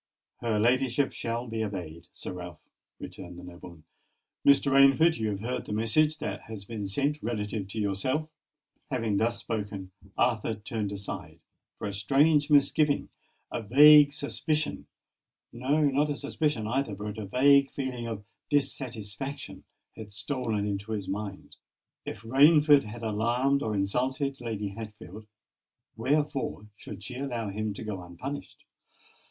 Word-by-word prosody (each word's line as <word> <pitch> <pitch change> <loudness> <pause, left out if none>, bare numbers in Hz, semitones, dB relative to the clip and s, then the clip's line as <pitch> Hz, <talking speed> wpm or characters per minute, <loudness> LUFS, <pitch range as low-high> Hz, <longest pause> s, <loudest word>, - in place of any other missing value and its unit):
"Her 115 -3 -1
ladyship 130 +4 +2
shall 120 +1 -3
be 110 -1 -2
obeyed, 90 -6 -6
Sir - - -7
Ralph," 90 -2 -8 0.4
returned 90 -2 -9
the 90 - -10
nobleman. 85 -2 -11 0.6
"Mr. 140 0 +5
Rainford, 135 +5 +6
you 110 -1 0
have 100 -1 -3
heard 125 +3 -3
the - - -3
message 150 +9 +2
that 100 -6 -4
has 105 -3 -8
been 105 -2 -5
sent 145 +9 -1
relative 105 -3 -3
to 105 +3 -5
yourself." 110 +10 -1 0.6
Having 115 -7 0
thus 115 +2 +1
spoken, 100 -5 -4 0.3
Arthur 115 -2 +1
turned 105 -1 -4
aside;—for 100 +1 -8
a 100 - -4
strange 145 +9 +3
misgiving—a 145 -3 +1
vague 145 +6 +8
suspicion—no, 145 -2 -3
not 145 +2 +1
a 145 - -1
suspicion 145 -4 -1
either,—but 105 -4 -2
a 135 +7 +4
feeling 130 -4 -4
of 110 -3 -5 0.3
dissatisfaction 135 -2 -3 0.3
had 110 -2 -9
stolen 110 -1 -2
into 100 +2 -3
his 100 -3 -3
mind. 100 -1 -6 0.5
If - - -6
Rainford 145 +3 +6
had 115 +2 -8
alarmed 120 +6 +1
or 110 -5 -1
insulted 130 +7 -1
Lady 110 -4 -3
Hatfield, 105 -1 -9 0.7
wherefore 145 -7 -1
should 100 - -9
she 125 +4 -7
allow 120 -6 -3
him 105 0 -3
to - - -6
go 105 -4 -4
unpunished? 90 +12 -8
115 Hz, 130 wpm, -28 LUFS, 105-140 Hz, 0.7 s, vague